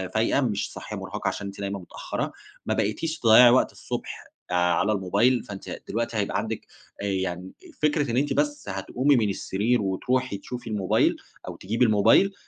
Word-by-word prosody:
فايقة، 115 +5 +2
مش 110 -6 -1
صاحية - - -7
مُرهَقه - - -5
عشان 100 - -3
أنتِ 100 0 -9
دايمًا 100 0 -3
متأخَّرة، 90 - -5 0.3
ما - - 0
بقيتيش 135 +10 -1
تضيَّعي 120 0 +8
وقت 125 +2 +4
الصبح - - -6 0.2
آآ - - +1
على 90 +4 +2
الموبايل، 105 +5 +2
فانتِ 100 -2 -8
دلوقتي 115 +1 -2
هيبقى 100 -1 0
عندِك، - - -4 0.4
آآ - - -2
يعني 95 -1 -2 0.3
فكرة 150 -3 +1
إن 120 - 0
أنتِ 145 +2 +1
بس 145 -6 -1
هتقومي 125 +9 +1
من 110 -4 +2
السرير 105 +5 0
وتروحي 105 +4 -1
تشوفي 120 +3 -7
الموبايل 100 -4 +2 0.3
أو - - -5
تجيبي 115 +6 0
الموبايل، 110 - +4
110 Hz, 170 wpm, -25 LUFS, 100-125 Hz, 0.4 s, تضيَّعي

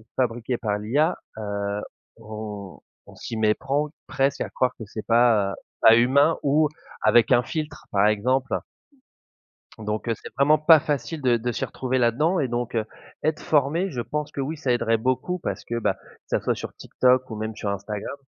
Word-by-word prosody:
fabriquées 120 -1 -1
par 105 -3 -1
l'IA, 140 +11 +1 0.2
heu, 100 -1 -3 0.4
on 105 -3 -8 0.3
on - - -14
s'y 115 - -6
méprend 135 +7 +1 0.2
presque 135 +1 0
à - - -2
croire 125 0 0
que 115 - -7
c'est 105 +2 -7
pas, 115 -4 +4
heu, - - -5 0.3
pas 115 0 +8
humain 140 +7 +4
ou 150 +1 +3 0.3
avec 120 +2 +4
un 120 - +6
filtre 155 -1 -5
par 100 +1 +4
exemple. 125 +5 +1 1.2
Donc 105 +1 -4
heu, - - +3
c'est - - -10
vraiment 150 +3 +4
pas 155 +1 +7
facile 150 +1 -3
de 120 -2 +3
de 120 +2 -2
s'y - - -3
retrouver 130 0 -2
là-dedans 150 +10 +2
et 135 - +1
donc 120 0 -3
heu, 110 -1 0 0.4
être 155 0 0
formé 155 +6 +1
je 125 -4 -3
pense 150 +4 -4
que 140 - -4
oui 150 +4 -3
ça 135 -4 -1
aiderait 115 -1 +2
beaucoup 130 +10 -1
parce - - -4
que, 120 - -3
bah, 100 -4 +1
que - - -24 0.3
ça - - 0
soit - - 0
sur - - -7
TikTok 130 0 +2
ou 110 - -5
même 110 0 -4
sur 100 - -3
Instagram, 100 +5 -4
120 Hz, 190 wpm, -24 LUFS, 110-140 Hz, 1.2 s, pas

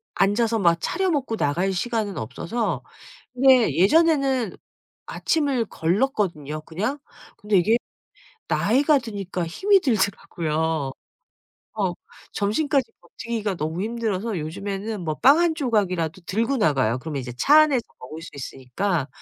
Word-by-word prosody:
앉아서 220 +3 +2
막 170 -4 +4
차려 380 +1 0
먹고 265 -7 -1
나갈 175 +6 0
시간은 210 - -2
없어서. 160 - -3 0.5
근데 255 - +5
예전에는 270 - +3 0.5
아침을 280 -7 0
걸렀거든요 170 - -1
그냥. 215 - -3 0.4
근데 210 -1 +1
이게 215 +6 +3 0.7
나이가 280 +7 +3
드니까 200 -7 -4
힘이 390 - +3
들더라고요. 160 - -1 0.8
어. 195 -5 -1 0.4
점심까지 270 +7 0
버티기가 220 -4 -4
너무 160 +3 -3
힘들어서 220 -2 -2
요즘에는 200 +6 -4
뭐 155 -2 -2
빵 275 - +5
1 340 -1 +3
조각이라도 190 - -1
들고 230 +9 0
나가요. 135 - +2
그러면 150 -1 -4
이제 125 -2 -6
차 295 - +6
안에서 275 -6 +2 0.2
먹을 155 +6 -9
수 170 - -9
있으니까. 140 +5 -3
205 Hz, 300 characters per minute, -23 LUFS, 165-245 Hz, 0.8 s, 차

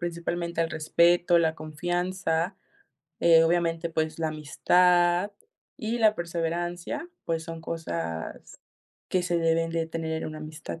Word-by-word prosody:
principalmente 170 0 -3
el 165 - -2
respeto, 170 +3 +3
la 160 -1 +2
confianza, 175 +3 -2 0.6
eh, 165 -1 +7
obviamente, 165 0 +1
pues, 160 0 -1
la 160 -1 0
amistad 175 +4 +3 0.5
y 225 +2 -2
la 215 -1 +5
perseverancia, 175 - -3 0.2
pues, 165 -1 -2
son 165 -1 -7
cosas 85 - -5 0.5
que 185 -1 +1
se 175 -1 0
deben 165 0 +1
de 165 -1 -1
tener 160 -1 -3
en - - -3
una 155 0 -7
amistad. 155 +1 -7
165 Hz, 135 wpm, -27 LUFS, 160-175 Hz, 0.6 s, eh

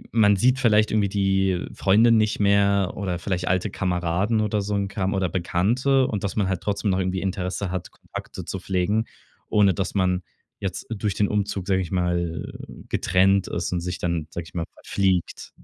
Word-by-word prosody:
man 105 -2 +5
sieht 125 +6 +3
vielleicht 110 -3 +3
irgendwie, 95 -2 +2
äh, 90 - -3
die - - -13
Freunde 110 +5 +4
nicht 110 -2 +2
mehr 100 -1 +3
oder 95 -3 -2
vielleicht 90 +1 -3
alte 95 +2 0
Kameraden 90 +4 0
oder 105 0 0
so 100 +1 -2
'n 100 -1 0
Kram 95 0 -2
oder 95 -1 +1
Bekannte 115 - +1
und 105 -6 -3
dass 100 - -2
man 100 -3 +1
halt 95 -2 -2
trotzdem 100 0 -1
noch 95 - +1
irgendwie 95 0 -1
Interesse 95 0 -2
hat, 95 -2 -4
Kontakte - - -9
zu 95 - -4
pflegen, 95 +4 0 0.4
ohne 100 -3 +4
dass 95 +3 -3
man 90 -1 +1 0.4
jetzt 95 -2 -4
durch 105 -3 -2
den 105 - +2
Umzug, 100 -2 -2
sag 95 -1 +2
ich 90 - -3
mal, 85 -2 -1
äh, - - -10
„getrennt“ 95 +1 +2
ist 85 +1 -3
und 90 - 0
sich 90 0 -4
dann, 85 -3 -2
sag 85 - -5
ich - - -15
mal, 85 -2 -2
„verfliegt“. 95 -3 -1
95 Hz, 195 wpm, -24 LUFS, 90-105 Hz, 0.4 s, man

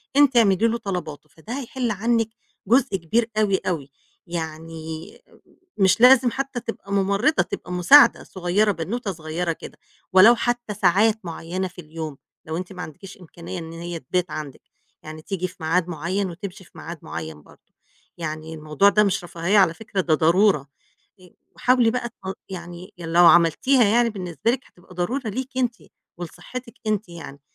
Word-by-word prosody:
أنتِ 280 -3 +5
اعملي 220 0 +4
له 230 - 0
طلباته، 160 -8 -5
فده 225 - -7
هيحل 255 -2 -3
عنِك 225 +2 0 0.4
جزء 250 -1 +3
كبير 225 +7 0
أوي 205 -3 +3
أوي، 145 -6 -2 0.4
يعني 160 -1 -6 0.7
مش 190 +1 +3
لازم 250 -1 +7
حتى 275 -2 -3
تبقى 225 -4 -8
مُمرضة، 200 +10 +2
تبقى - - -7
مساعدة 180 +12 +6
صغيّرة، 190 +3 0
بنوتة 200 +5 -3
صغيّرة 165 +1 -3
كده، 160 - -9 0.4
ولو 210 +6 +8
حتّى 240 -2 -2
ساعات 210 +3 +3
معيّنة 175 +3 -4
في 180 0 -11
اليوم، 155 -2 -7 0.3
لو 160 0 -4
أنتِ 185 +2 -6
ما 180 - -7
عندكيش 190 +7 -10
إمكانية 175 +1 -8
إن 165 -1 -8
هي 170 0 -6
تبات 180 +7 -2
عندِك، 145 -4 -7 0.4
يعني 155 0 -9
تيجي 185 +1 -3
في 180 - -15
معاد 165 +2 +1
معيّن 180 +4 -2
وتمشي 190 +2 -8
في - - -22
معاد 170 0 -8
معيّن 80 -2 -7
برضه - - -22 0.4
يعني 155 -1 -5
الموضوع 155 +5 +2
ده 210 +1 +4
مش 195 -3 0
رفاهية 175 +4 0
على 185 -5 +5
فكرة، 205 -1 -3
ده 170 -3 +1
ضرورة، 165 -1 +3 0.5
آآ، 180 -1 -17 0.2
وحاولي 250 -2 +3
بقى 245 0 -2
تل 190 -4 -8
يعني 175 +1 -9
لو 170 +1 +4
عملتيها 175 - +5
يعني 230 +3 +3
بالنسبة 180 - -2
لِك 250 +1 -1
هتبقى 180 +1 -19
ضرورة 230 +8 -2
ليكِ 260 +5 -5
أنتِ 245 -2 +1 0.4
ولصحتِك 235 +8 -8
أنتِ 215 -2 -1
يعني. 155 -5 -10
185 Hz, 160 wpm, -23 LUFS, 165-225 Hz, 0.7 s, ولو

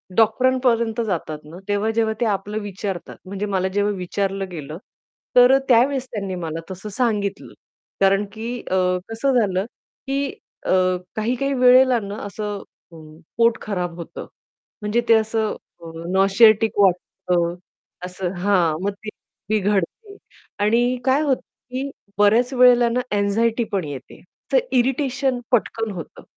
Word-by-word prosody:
डॉक्टरांपर्यंत 235 0 +2
जातात 165 -5 -3
ना, 165 +4 -11
तेव्हा 205 +2 0
जेव्हा 220 -1 +1
ते - - +3
आपलं 210 0 -2
विचारतात, 200 -2 -5
म्हणजे 200 +2 -4
मला 190 0 +1
जेव्हा 205 0 +1
विचारलं 195 +1 -2
गेलं, 155 -1 -7 0.6
तर 245 +1 +8
अ, - - +6
त्यावेळेस 255 +2 +4
त्यांनी 195 -4 -4
मला 160 0 -4
तसं 190 +3 -7
सांगितलं 210 -5 -1 0.5
कारण, 195 +1 +4
की 235 +3 -5
अ, - - +2 0.3
कसं 250 +3 +1
झालं, 195 -2 0 0.4
की 275 +1 0 0.4
अ, - - 0 0.4
काही-काही 250 +5 -1
वेळेला 255 -1 +5
ना 200 0 -6
असं 205 0 -5 0.3
अ, - - -14 0.4
पोट 230 -1 +4
खराब 180 -5 -3
होतं 170 0 -8 0.5
म्हणजे 210 +3 +1
ते - - +8
असं 220 0 +1 0.3
अ, 165 - -8 0.2
नॉसिएटिक 210 +3 +4
वाटतं 180 -2 +1 0.5
असं 180 0 -4
हां, 175 -4 +2
मग 200 - 0
ते 215 +2 -9 0.4
बिघडते 205 -4 +1 0.7
आणि 240 +4 +2
काय 265 +2 +3
होतं, 280 -4 +1 0.3
की 270 +2 -2 0.3
बऱ्याच 220 +5 +4
वेळेला 250 -1 +6
ना 245 - 0 0.2
अँक्साइटी 225 +4 +1
पण 195 -3 0
येते 135 -3 -9 0.3
तर - - +5 0.2
इरिटेशन 265 0 0
पटकन 225 -2 0
होतं. 175 -5 -9
215 Hz, 135 wpm, -22 LUFS, 195-240 Hz, 0.7 s, तर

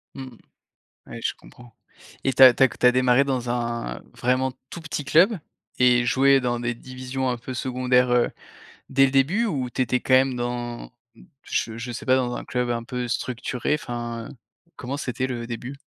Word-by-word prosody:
Mmh. 130 -3 -9 0.7
Ouais, - - -9
je - - -1
comprends. 120 -2 -17 0.5
Et 135 - +2
tu 130 - +3
as 130 - +11
tu 135 - +1
as 130 - +7
tu 125 - 0
as 125 - +7
démarré 130 +1 +3
dans 130 -3 -2
un 120 - -3
vraiment 130 +1 0 0.2
tout 170 - -7
petit 155 -2 -5
club 180 - +4 0.4
et 125 -1 +4
joué 135 +2 +4
dans 120 -1 -1
des 120 0 -2
divisions 130 +1 -5
un 125 -1 -1
peu 125 +2 -7
secondaires, 125 0 +1
heu, 120 -1 +3 0.6
dès 135 0 +4
le 130 - -1
début? 155 - +2
Ou 135 - -2
tu 130 - -3
étais 125 +1 +1
quand 130 - -1
même 130 0 +4
dans, 120 -1 -4 0.5
je 115 -1 -2
je 120 +2 -5
sais 125 +4 -7
pas 130 - +4
dans 125 -2 -1
un - - -6
club 125 -1 -2
un 115 -1 -2
peu 125 +1 -4
structuré? 125 +2 -2
Enfin, 120 -4 -5 0.5
comment 130 +3 -5
c'était 130 -2 -3
le 120 -2 -5
début? 120 +3 -6
125 Hz, 195 wpm, -24 LUFS, 120-130 Hz, 0.7 s, as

